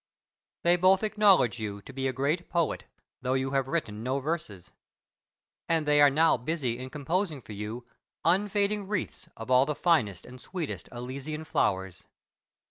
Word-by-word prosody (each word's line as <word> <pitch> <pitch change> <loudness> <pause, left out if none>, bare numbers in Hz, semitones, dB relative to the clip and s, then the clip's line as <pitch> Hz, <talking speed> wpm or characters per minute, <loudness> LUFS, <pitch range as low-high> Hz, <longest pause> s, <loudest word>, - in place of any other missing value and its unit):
They 175 +1 +4
both 185 +3 +4
acknowledge 205 - +4
you 105 -2 -4
to - - -11
be 135 0 -1
a - - 0
great 145 +7 -1
poet, 170 -2 0 0.4
though 130 0 0
you 135 0 -1
have 135 -1 +1
written 120 -9 -2
no 130 +4 -1
verses. 135 - -4 1.0
And 165 -2 +2
they 145 0 +4
are 145 - +8
now 160 +2 +4
busy 125 -2 -2
in 130 0 -6
composing 155 +3 -2
for 110 - -11
you 105 +4 -6 0.4
unfading 200 +3 +1
wreaths 205 -3 -4
of 115 +3 -6
all 130 +2 +5
the 150 - -1
finest 115 - +1
and 125 0 -12
sweetest 175 -5 -5
Elysian 135 +6 -5
flowers. 95 - -1
140 Hz, 160 wpm, -28 LUFS, 125-170 Hz, 1.0 s, are